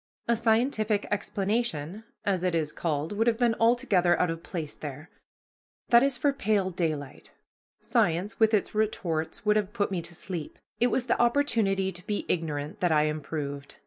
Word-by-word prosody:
A 235 Hz, -, +3 dB
scientific 220 Hz, -2 st, +1 dB
explanation, 200 Hz, -2 st, -2 dB, 0.2 s
as 195 Hz, -3 st, +1 dB
it 180 Hz, -2 st, 0 dB
is 155 Hz, -2 st, 0 dB
called, 155 Hz, -2 st, -2 dB
would 220 Hz, +3 st, 0 dB
have 230 Hz, -1 st, +3 dB
been 240 Hz, -1 st, +3 dB
altogether 195 Hz, -7 st, +3 dB
out 180 Hz, -, +2 dB
of 165 Hz, 0 st, -6 dB
place 160 Hz, -4 st, -5 dB
there. 145 Hz, +2 st, -8 dB, 0.8 s
That 235 Hz, 0 st, +7 dB
is 275 Hz, -1 st, +2 dB
for 285 Hz, +3 st, +2 dB
pale 205 Hz, -6 st, +1 dB
daylight. 155 Hz, -6 st, -3 dB, 0.5 s
Science 175 Hz, +5 st, 0 dB
with 220 Hz, -1 st, +5 dB
its 210 Hz, -3 st, +1 dB
retorts 195 Hz, -6 st, -1 dB
would 210 Hz, 0 st, +4 dB
have 210 Hz, -1 st, -1 dB
put 205 Hz, -4 st, 0 dB
me 180 Hz, -3 st, -1 dB
to 170 Hz, +1 st, -11 dB
sleep; 170 Hz, -3 st, -6 dB, 0.2 s
it 245 Hz, -, +4 dB
was 250 Hz, 0 st, 0 dB
the 240 Hz, -, +1 dB
opportunity 225 Hz, -7 st, +2 dB
to 180 Hz, +1 st, -12 dB
be 210 Hz, -, -2 dB
ignorant 150 Hz, -3 st, -2 dB
that 175 Hz, -2 st, +2 dB
I 150 Hz, -1 st, +4 dB
improved. 145 Hz, -2 st, -4 dB
190 Hz, 175 wpm, -28 LUFS, 160-220 Hz, 0.8 s, That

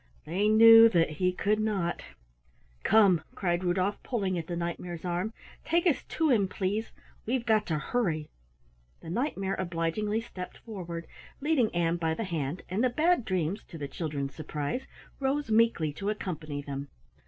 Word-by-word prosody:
They 190 Hz, +6 st, 0 dB
knew 225 Hz, +1 st, +9 dB
that 165 Hz, -6 st, +2 dB
he 180 Hz, +4 st, +1 dB
could 210 Hz, +3 st, 0 dB
not. 200 Hz, -6 st, -1 dB, 0.8 s
"Come," 195 Hz, -5 st, +5 dB
cried 175 Hz, -1 st, 0 dB
Rudolf, 185 Hz, +3 st, 0 dB
pulling 200 Hz, -7 st, -1 dB
at 165 Hz, -2 st, -4 dB
the 175 Hz, -, -3 dB
Knight 170 Hz, 0 st, -3 dB
mare's 175 Hz, -1 st, -7 dB
arm. 180 Hz, +4 st, -1 dB, 0.3 s
"Take 340 Hz, +1 st, +1 dB
us 335 Hz, -6 st, +2 dB
to 315 Hz, -2 st, 0 dB
him, 205 Hz, -6 st, +3 dB
please. 200 Hz, +4 st, -2 dB, 0.4 s
We've 245 Hz, 0 st, 0 dB
got 215 Hz, -2 st, +2 dB
to 155 Hz, -, 0 dB
hurry." 155 Hz, -4 st, -1 dB, 0.7 s
The 165 Hz, -, -7 dB
Knight 255 Hz, -, -1 dB
mare 195 Hz, 0 st, -1 dB
obligingly 185 Hz, +5 st, -1 dB
stepped 185 Hz, -6 st, -8 dB
forward, 175 Hz, -6 st, -7 dB, 0.3 s
leading 280 Hz, -6 st, +2 dB
Ann 170 Hz, 0 st, +1 dB
by 160 Hz, -1 st, 0 dB
the 225 Hz, -, -3 dB
hand, 165 Hz, -4 st, -3 dB
and 195 Hz, +6 st, -1 dB
the 255 Hz, -, +4 dB
Bad 310 Hz, +1 st, +2 dB
Dreams 185 Hz, +1 st, -1 dB
to 165 Hz, -, -10 dB
the 145 Hz, -2 st, -4 dB
children's 140 Hz, -2 st, -4 dB
surprise 155 Hz, -, -4 dB, 0.3 s
rose 275 Hz, -2 st, -1 dB
meekly 215 Hz, -9 st, +3 dB
to 200 Hz, +6 st, -3 dB
accompany 155 Hz, -8 st, -4 dB
them. 140 Hz, 0 st, -5 dB
185 Hz, 165 wpm, -29 LUFS, 165-220 Hz, 0.8 s, knew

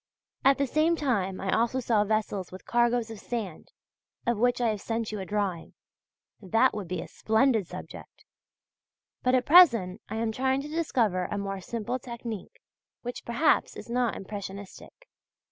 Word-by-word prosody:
At 275 Hz, +1 st, +5 dB
the 280 Hz, -, +1 dB
same 310 Hz, +5 st, +2 dB
time 205 Hz, -, -1 dB
I 190 Hz, 0 st, 0 dB
also 235 Hz, +3 st, +1 dB
saw 225 Hz, -4 st, +2 dB
vessels 210 Hz, -3 st, -1 dB
with 185 Hz, 0 st, -10 dB
cargoes 240 Hz, -1 st, +1 dB
of 220 Hz, -, -8 dB
sand, 215 Hz, -9 st, -5 dB, 0.5 s
of 235 Hz, -3 st, +1 dB
which 245 Hz, +1 st, +2 dB
I 240 Hz, -2 st, +2 dB
have 210 Hz, -2 st, -2 dB
sent 225 Hz, -1 st, -2 dB
you 210 Hz, -, -4 dB
a 190 Hz, -, -6 dB
drawing. 200 Hz, -5 st, -2 dB, 0.7 s
That 225 Hz, +6 st, +3 dB
would 205 Hz, -4 st, -5 dB
be 180 Hz, -, -3 dB
a -, -, -8 dB
splendid 220 Hz, -3 st, +2 dB
subject! -, -, -10 dB, 1.0 s
But 255 Hz, +1 st, +3 dB
at 250 Hz, -1 st, +2 dB
present 230 Hz, -, +6 dB
I 220 Hz, -, -4 dB
am 225 Hz, 0 st, 0 dB
trying 265 Hz, +3 st, 0 dB
to -, -, -6 dB
discover 240 Hz, -, 0 dB
a 205 Hz, -, -3 dB
more 195 Hz, -1 st, -3 dB
simple 235 Hz, +5 st, -3 dB
technique 235 Hz, -4 st, -7 dB, 0.4 s
which 245 Hz, 0 st, -6 dB
perhaps 235 Hz, +7 st, +2 dB
is -, -, -9 dB
not 245 Hz, -2 st, +1 dB
impressionistic. 200 Hz, -, -8 dB
225 Hz, 165 wpm, -28 LUFS, 200-250 Hz, 1.0 s, present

